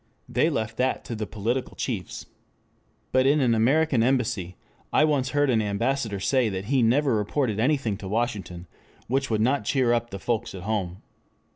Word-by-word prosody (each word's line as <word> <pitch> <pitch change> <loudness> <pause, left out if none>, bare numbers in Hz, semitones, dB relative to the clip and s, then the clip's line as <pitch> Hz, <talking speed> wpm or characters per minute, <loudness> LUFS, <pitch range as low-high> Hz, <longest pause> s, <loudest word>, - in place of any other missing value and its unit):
They - - +2
left 110 0 -3
that 130 +1 0
to 115 - -5
the 110 -1 -4
political 115 +5 -3
chiefs. 105 - -4 0.9
But 130 0 +3
in 145 +2 +4
an 125 -4 +3
American 130 +3 +3
Embassy 115 -8 0 0.3
I - - +4
once 140 -4 +1
heard 145 0 +2
an 115 -2 +2
ambassador 110 +1 -1
say 125 +3 +2
that 95 -1 -4
he 130 +3 +2
never 130 +4 +3
reported 110 +1 -1
anything 125 -5 +1
to 95 - -8
Washington 105 -5 -3 0.4
which 135 +2 -1
would 110 -2 +1
not 130 +2 +2
cheer 125 +2 +2
up 120 0 -1
the 100 - -6
folks 115 +2 -2
at 90 - -8
home. 95 -4 -3
115 Hz, 175 wpm, -25 LUFS, 105-130 Hz, 0.9 s, in